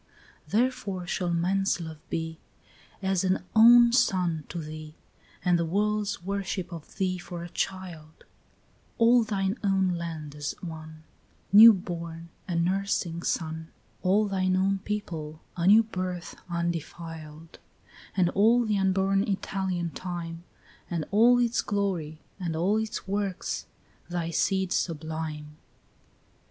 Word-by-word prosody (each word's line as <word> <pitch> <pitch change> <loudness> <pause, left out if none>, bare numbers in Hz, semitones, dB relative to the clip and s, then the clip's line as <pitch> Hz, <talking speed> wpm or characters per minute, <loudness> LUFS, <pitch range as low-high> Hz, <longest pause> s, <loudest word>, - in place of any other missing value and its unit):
8 - - -18
Therefore 225 -6 0
shall 175 0 -1
man's 190 +3 +1
love 160 -2 -7
be 160 0 -3 0.6
As 190 -1 +1
an 185 0 +1
own 235 +1 +8
son 180 - +2
to 175 - -6
thee, 155 0 -8 0.5
And 175 -1 +4
the - - +2
world's 210 +1 0
worship 195 -1 -3
of 165 -3 -10
thee 185 -2 0
for 175 -1 -7
a 175 - -7
child; 170 -5 -5 0.7
All 235 +1 +6
thine 200 0 -1
own 195 -2 +2
land 165 -4 -4
as 145 0 -4
one 155 -2 -9 0.5
New 225 +3 +11
born, 170 -3 -5 0.2
a 175 - -2
nursing 175 -1 0
son, 160 -1 -2 0.3
All 200 +3 +3
thine 185 -2 +1
own 195 +1 +1
people 165 -7 -5 0.2
a 170 0 0
new 215 +3 +8
birth 185 -5 -5
undefiled; 165 -2 -5 0.6
And 175 -2 +3
all 230 +4 +4
the 210 -2 +1
unborn 195 +1 +2
Italian 190 -3 -2
time, 170 -2 -6 0.5
And 165 -3 -2
all 235 +4 +6
its 240 -1 +2
glory, 180 -7 -2 0.2
and 170 -3 -3
all 185 +6 +2
its 220 -2 -3
works, 200 -1 -2 0.4
thy 170 -1 -2
seed 190 +1 +1
sublime. 155 -2 -3
180 Hz, 130 wpm, -27 LUFS, 165-195 Hz, 0.7 s, New